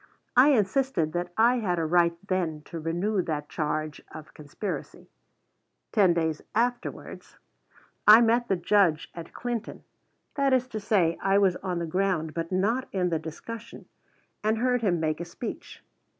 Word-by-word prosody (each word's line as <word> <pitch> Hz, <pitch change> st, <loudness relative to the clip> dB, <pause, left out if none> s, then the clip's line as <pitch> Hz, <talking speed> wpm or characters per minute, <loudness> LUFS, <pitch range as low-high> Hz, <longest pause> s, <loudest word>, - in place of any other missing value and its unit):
I 255 Hz, +3 st, +7 dB
insisted 210 Hz, -, +1 dB
that 175 Hz, 0 st, -3 dB
I 235 Hz, +3 st, +4 dB
had 180 Hz, -6 st, -1 dB
a 165 Hz, -, 0 dB
right 170 Hz, +1 st, +3 dB
then 170 Hz, -5 st, -1 dB
to 165 Hz, -, -7 dB
renew 175 Hz, +6 st, -1 dB
that 150 Hz, -3 st, -4 dB
charge 155 Hz, -1 st, -3 dB
of 155 Hz, -1 st, -11 dB
conspiracy. 155 Hz, +7 st, -7 dB, 0.8 s
Ten 190 Hz, -6 st, +4 dB
days 160 Hz, -2 st, -1 dB
afterwards 240 Hz, +2 st, -3 dB, 0.7 s
I 215 Hz, +2 st, +10 dB
met 235 Hz, +1 st, +2 dB
the 195 Hz, -, +2 dB
Judge 175 Hz, -3 st, +2 dB
at 170 Hz, -1 st, -9 dB
Clinton, 235 Hz, -2 st, -5 dB, 0.5 s
that 275 Hz, -2 st, +1 dB
is 255 Hz, -1 st, +2 dB
to 220 Hz, -, -4 dB
say, 190 Hz, -6 st, +1 dB
I 195 Hz, +1 st, +3 dB
was 195 Hz, -3 st, +3 dB
on 185 Hz, -2 st, -3 dB
the 170 Hz, -, -2 dB
ground, 165 Hz, -2 st, -1 dB
but 165 Hz, +1 st, -4 dB
not 215 Hz, +8 st, 0 dB
in 180 Hz, -2 st, 0 dB
the 165 Hz, -2 st, 0 dB
discussion, 225 Hz, +9 st, -9 dB, 0.6 s
and 215 Hz, +1 st, +1 dB
heard 250 Hz, +1 st, +1 dB
him 185 Hz, -6 st, +1 dB
make 155 Hz, -1 st, -1 dB
a -, -, -3 dB
speech. 175 Hz, +7 st, -8 dB
185 Hz, 160 wpm, -27 LUFS, 165-225 Hz, 0.8 s, I